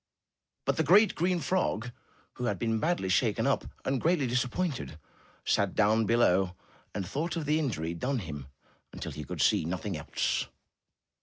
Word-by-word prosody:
But - - +1
the 160 - +3
great, 200 +8 +6
green 180 +2 +1
frog 125 - 0 0.4
who 125 - -4
had - - 0
been 115 -1 0
badly 160 - 0
shaken 95 - +2
up - - +1 0.2
and 135 -1 0
greatly 165 -4 +2
disappointed, 125 - -1 0.5
sat 100 -2 +1
down 110 +1 +3
below 95 -5 +3 0.4
and 100 -3 -2
thought 160 - -2
of 165 -3 -2
the 150 +2 +2
injury 85 - -2
done 130 +10 -1
him 75 - -6 0.5
till - - -4
he 75 +2 -6
could 70 - -4
see - - +4
nothing 90 +4 -3
else. 75 - -1
120 Hz, 160 wpm, -30 LUFS, 95-155 Hz, 0.5 s, great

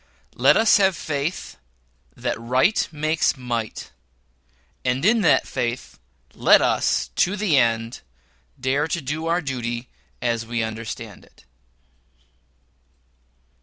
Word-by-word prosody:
LET 130 +3 +4
US 220 -1 +5
HAVE 190 -3 +3
FAITH 155 +2 -4 0.6
THAT 115 - -3
RIGHT 130 - +2
MAKES 155 -1 0
MIGHT, 120 -4 -4 0.9
AND 130 +4 0
IN 225 +2 +4
THAT 165 - +4
FAITH 125 -1 -4 0.3
LET - - +5
US, - - +1
TO 190 - +2
THE 200 -8 +1
END, 115 0 0 0.6
DARE 135 +4 0
TO 170 - -2
DO 155 +4 -4
OUR 170 +2 +1
DUTY 120 -4 -4 0.3
AS 115 -1 -1
WE 115 0 -2
UNDERSTAND 110 -1 -7
IT. - - -25
130 Hz, 115 wpm, -22 LUFS, 120-160 Hz, 0.9 s, US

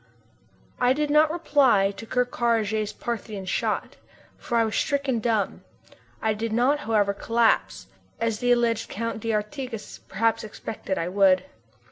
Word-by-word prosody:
I 250 +1 +4
did 295 +1 -1
not 305 +1 +5
reply 275 - +3
to 200 +3 -10
Ker 250 +2 +1
Karraje's 220 -3 0
Parthian 215 -3 -5
shot, - - -2 0.4
for 255 -6 -2
I 230 - +4
was 220 -2 -2
stricken 280 -5 0
dumb. 220 -3 -1 0.6
I 220 -1 +2
did 220 +1 -3
not, 250 +6 +2
however, 210 -6 +1
collapse, 230 +3 +1 0.3
as 225 -2 -1
the 245 0 +1
alleged 235 -2 +1
Count 230 +1 -3
d'Artigas 225 +2 -4
perhaps 225 +3 0
expected 210 -2 -5
I 165 - -1
would. 185 -1 +4
225 Hz, 140 wpm, -25 LUFS, 210-245 Hz, 0.6 s, not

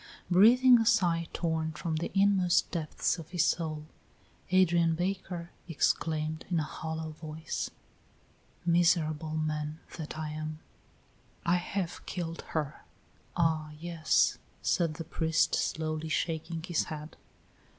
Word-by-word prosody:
Breathing 240 +7 +7
a 225 - +1
sigh 175 -7 +3
torn 160 -2 -1
from 160 +1 -2
the 165 - -3
inmost 195 -3 +3
depths 165 +1 -1
of 160 -1 -9
his 175 -3 +2
soul, 155 -3 -1 0.6
Adrian 170 -3 +4
Baker 180 -1 -3 0.2
exclaimed 155 0 0
in 175 -3 +1
a - - 0
hollow 160 +1 -5
voice: 155 0 -5 1.0
"Miserable 165 -3 +2
man 155 0 -2 0.2
that 155 -1 -6
I 155 -1 -3
am! 155 0 -5 0.9
I 175 +1 +4
have 180 0 -3
killed 170 -2 -4 0.2
her!" 150 -1 -3 0.5
"Ah, 160 -2 +1
yes," 165 -1 +2 0.2
said 165 -3 +1
the 165 - -5
priest, 160 0 +1
slowly 155 0 -1
shaking 165 0 -2
his 175 -2 0
head. 155 0 -7
165 Hz, 120 wpm, -30 LUFS, 155-175 Hz, 1.0 s, Breathing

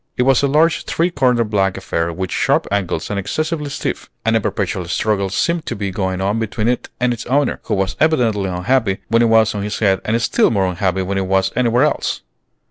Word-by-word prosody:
It 125 - +3
was 135 0 +4
a 140 - +2
large 155 +4 +2
three 170 +2 0
cornered 125 -7 +1
black 95 -2 +1
affair, 85 +1 -2
with 90 +2 -4
sharp - - +1
angles 100 -4 -2
and 100 - -1
excessively 155 - -2
stiff; 140 - -4 0.2
and 115 0 +2
a 110 - +2
perpetual 100 -3 -2
struggle 100 +1 0
seemed 170 - -1
to - - -2
be 100 -1 -3
going 95 -1 -2
on 100 +3 0
between 110 0 -2
it 125 0 -1
and 125 -1 +2
its 120 - -7
owner, 140 +2 +1
who - - 0
was 95 0 -1
evidently 115 -11 +2
unhappy 95 +3 0
when 115 +2 +3
it - - +5
was 110 -1 +4
on 105 - -3
his 105 +1 -3
head 95 -3 +2
and 115 +2 0
still 120 - +2
more 100 -4 +1
unhappy 95 +1 -1
when 95 +1 -2
it 95 - -2
was 95 0 +1
anywhere 125 +1 +2
else. 150 - 0
105 Hz, 220 wpm, -18 LUFS, 95-125 Hz, 0.2 s, it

